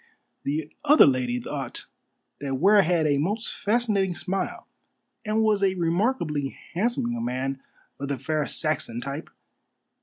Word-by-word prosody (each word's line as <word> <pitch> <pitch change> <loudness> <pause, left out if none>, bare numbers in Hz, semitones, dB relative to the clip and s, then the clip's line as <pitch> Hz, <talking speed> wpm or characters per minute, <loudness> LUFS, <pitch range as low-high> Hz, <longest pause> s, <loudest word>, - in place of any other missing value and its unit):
The 150 +2 -2
other 300 +1 +8
lady 125 -2 +1
thought - - -5 0.5
that 140 -1 -2
Ware 200 +7 +6
had 170 -3 +2
a 145 -2 +2
most 210 +9 -1
fascinating 205 -4 +1
smile, 190 0 -3 0.6
and 215 +1 +1
was 215 -2 +3
a 190 -1 +2
remarkably 170 - 0 0.2
handsome 190 - 0
young 120 -1 -3
man 130 +2 -2 0.4
of 140 - -3
the 140 -1 -2
fair 150 +3 -1
Saxon 150 -7 -1
type. 140 +4 -5
160 Hz, 140 wpm, -26 LUFS, 135-200 Hz, 0.6 s, other